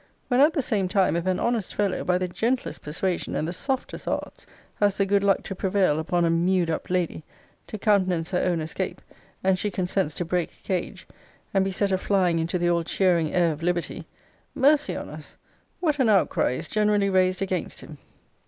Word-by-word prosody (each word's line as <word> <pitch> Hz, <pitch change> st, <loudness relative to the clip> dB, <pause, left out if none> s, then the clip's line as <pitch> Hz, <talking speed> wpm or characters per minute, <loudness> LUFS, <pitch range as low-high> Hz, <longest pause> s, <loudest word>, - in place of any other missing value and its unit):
when 250 Hz, -1 st, +3 dB
at 300 Hz, +3 st, +6 dB
the 285 Hz, -, 0 dB
same 200 Hz, -6 st, 0 dB
time, 190 Hz, -2 st, +2 dB
if 170 Hz, +2 st, -2 dB
an 185 Hz, -1 st, +1 dB
honest 235 Hz, -5 st, -1 dB
fellow, 200 Hz, -2 st, 0 dB
by 180 Hz, 0 st, +2 dB
the 185 Hz, 0 st, -1 dB
gentlest 235 Hz, +8 st, -2 dB
persuasion, 175 Hz, +4 st, -2 dB
and 155 Hz, -, -1 dB
the 170 Hz, -, -3 dB
softest 265 Hz, -, -3 dB
arts, -, -, -4 dB, 0.3 s
has 205 Hz, -1 st, +2 dB
the 195 Hz, -, +2 dB
good 200 Hz, 0 st, +2 dB
luck 195 Hz, -2 st, +2 dB
to -, -, -5 dB
prevail 185 Hz, -5 st, +1 dB
upon 170 Hz, +2 st, +1 dB
a -, -, +2 dB
mew'd 175 Hz, 0 st, +2 dB
up 160 Hz, -, -4 dB
lady, 180 Hz, -3 st, -1 dB, 0.4 s
to 215 Hz, -, -6 dB
countenance 185 Hz, -5 st, +1 dB
her 180 Hz, -, +1 dB
own 175 Hz, -3 st, 0 dB
escape, 165 Hz, +4 st, -4 dB, 0.4 s
and 190 Hz, -1 st, +2 dB
she 210 Hz, -, 0 dB
consents 180 Hz, -4 st, -1 dB
to 175 Hz, -, -2 dB
break 175 Hz, 0 st, -3 dB
cage, 185 Hz, -2 st, -3 dB, 0.5 s
and 195 Hz, -1 st, +3 dB
be 195 Hz, -, -1 dB
set 200 Hz, +1 st, 0 dB
a 190 Hz, -, +1 dB
flying 185 Hz, -5 st, +2 dB
into 165 Hz, +2 st, -1 dB
the 175 Hz, 0 st, 0 dB
all 170 Hz, -1 st, +2 dB
cheering 170 Hz, -2 st, +1 dB
air 175 Hz, -2 st, +3 dB
of 150 Hz, -, -10 dB
liberty, 175 Hz, 0 st, -2 dB, 0.5 s
mercy 295 Hz, +2 st, +3 dB
on -, -, -5 dB
us! -, -, -11 dB, 0.4 s
what 305 Hz, -5 st, +1 dB
an 250 Hz, -4 st, +3 dB
outcry 195 Hz, -10 st, +2 dB
is -, -, -5 dB
generally 210 Hz, -1 st, +2 dB
raised 185 Hz, 0 st, +2 dB
against 185 Hz, -3 st, -3 dB
him! 150 Hz, -2 st, -11 dB
185 Hz, 200 wpm, -25 LUFS, 175-200 Hz, 0.5 s, at